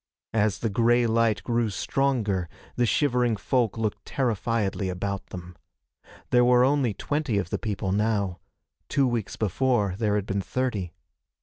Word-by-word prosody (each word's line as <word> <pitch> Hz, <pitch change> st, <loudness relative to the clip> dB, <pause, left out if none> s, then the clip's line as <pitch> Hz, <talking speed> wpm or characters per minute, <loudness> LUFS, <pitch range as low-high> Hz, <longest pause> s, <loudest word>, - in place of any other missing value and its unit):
As 105 Hz, -2 st, +2 dB
the 115 Hz, -, -1 dB
gray 120 Hz, +3 st, +3 dB
light 115 Hz, -2 st, +2 dB
grew 120 Hz, -2 st, 0 dB
stronger 105 Hz, -4 st, 0 dB, 0.3 s
the 120 Hz, -, +2 dB
shivering 125 Hz, -3 st, +2 dB
folk 120 Hz, 0 st, 0 dB
looked 110 Hz, -2 st, -2 dB
terrifiedly 110 Hz, -5 st, -1 dB
about 100 Hz, +2 st, -3 dB
them. 90 Hz, 0 st, -9 dB, 0.8 s
There 125 Hz, 0 st, +5 dB
were 125 Hz, 0 st, +5 dB
only 130 Hz, -5 st, +2 dB
twenty 145 Hz, -5 st, -1 dB
of 90 Hz, -3 st, -2 dB
the -, -, -1 dB
people 100 Hz, -3 st, -2 dB
now. 100 Hz, -3 st, 0 dB, 0.5 s
Two 140 Hz, -1 st, +2 dB
weeks 115 Hz, -5 st, -2 dB
before 110 Hz, -1 st, +1 dB
there 105 Hz, -3 st, +1 dB
had 105 Hz, -2 st, -1 dB
been 100 Hz, 0 st, -1 dB
thirty. 100 Hz, -7 st, -2 dB
110 Hz, 145 wpm, -26 LUFS, 100-125 Hz, 0.8 s, There